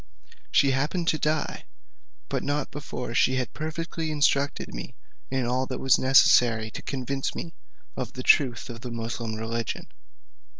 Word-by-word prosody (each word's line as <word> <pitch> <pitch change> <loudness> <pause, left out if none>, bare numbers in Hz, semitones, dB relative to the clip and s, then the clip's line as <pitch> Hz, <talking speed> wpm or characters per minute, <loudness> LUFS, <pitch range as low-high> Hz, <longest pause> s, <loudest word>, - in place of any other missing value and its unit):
She 140 -1 +4
happened 150 +6 0
to 155 - +1
die, 155 0 -1 0.6
but - - -1
not 145 0 -2
before 130 -4 -5
she 130 +2 +3
had 130 -1 -2
perfectly 160 +1 -4
instructed 145 -1 +1
me - - -7 0.3
in 130 -1 0
all 130 +2 0
that 130 - -4
was 135 -2 +4
necessary 120 -4 +5
to - - -7
convince 135 0 -3
me 165 - -5 0.4
of 125 -3 -4
the 130 - -6
truth 125 -5 +4
of 115 -2 -8
the 125 - -6
Moosulmaun 115 -1 -4
religion. 115 +1 -3
130 Hz, 155 wpm, -26 LUFS, 120-145 Hz, 0.6 s, necessary